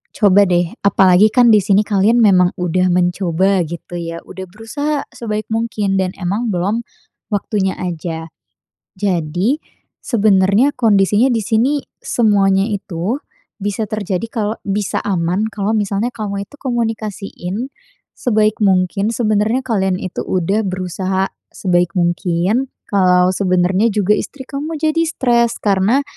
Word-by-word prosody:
coba 205 -1 +5
deh, 175 0 +1
apalagi 190 +1 +5
kan 245 -1 +5
di 210 - +5
sini 200 +2 +2
kalian 210 +3 +2
memang 185 -4 +5
udah 180 +1 +1
mencoba 180 +1 +1
gitu 170 +2 -8
ya, 165 0 -5
udah 190 - -8
berusaha 275 +9 -3
sebaik 215 -2 -4
mungkin 215 -4 -1
dan 185 -1 -1
emang 200 +6 -2
belum 200 +6 0 0.5
waktunya 200 -2 -1
aja. 165 -2 -4 0.7
Jadi, 185 - 0 0.4
sebenarnya 210 +2 +3
kondisinya 210 0 +3
di 225 -2 0
sini 235 +5 +2 0.3
semuanya 195 -4 +2
itu 200 +2 -3 0.4
bisa 205 +2 -2
terjadi 205 -1 -3
kalau 220 -1 -2
bisa 200 0 -1
aman 185 +1 0
kalau 205 0 -2
misalnya 205 +2 -1
kamu 200 -3 -4
itu - - -16
komunikasiin 220 -3 -3 0.5
sebaik 215 -3 +1
mungkin, 195 +1 +2
sebenarnya 220 +2 +1
kalian 190 -6 +1
itu 185 - -6
udah 190 +4 0
berusaha 185 +1 -2 0.2
sebaik 175 -2 0
mungkin, 175 +7 0 0.2
kalau 180 -2 +4
sebenarnya 185 +2 +2
juga 210 0 +3
istri 285 - -6
kamu 300 +3 -4
jadi 315 +1 +1
stres, 235 -7 +1
karena 205 +6 +2
200 Hz, 125 wpm, -17 LUFS, 185-225 Hz, 0.7 s, coba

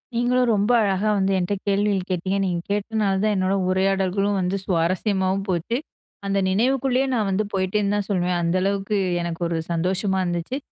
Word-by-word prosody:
நீங்களும் 245 +1 +2
ரொம்ப 205 +3 +1
அழகா 200 0 +1
வந்து, 195 0 +1
என்கிட்ட 180 +2 -1
கேள்விகள் 200 -1 +1
கேட்டீங்க. 185 +2 -1
நீங்க 175 -3 -1
கேட்டதனால 205 -1 0
தான் 215 0 +2
என்னோட 190 0 +1
உரையாடல்களும் 195 +1 +1
வந்து 185 +2 -1
சுவாரஸ்யமாவும் 190 +2 0
போச்சு. 185 +7 -1 0.5
அந்த 195 0 0
நினைவுக்குள்ளேயே 260 +5 +1
நான் 215 -4 0
வந்து 195 +3 +1
போயிட்டேன்னு 200 +2 0
தான் 205 -1 -2
சொல்வேன். 180 -2 0
அந்த 170 +2 0
அளவுக்கு 200 +1 0 0.3
எனக்கு 170 0 -5
ஒரு 170 - -1
சந்தோஷமா 190 +3 0
இருந்துச்சு. 175 +8 -2
195 Hz, 155 wpm, -23 LUFS, 185-210 Hz, 0.5 s, நீங்களும்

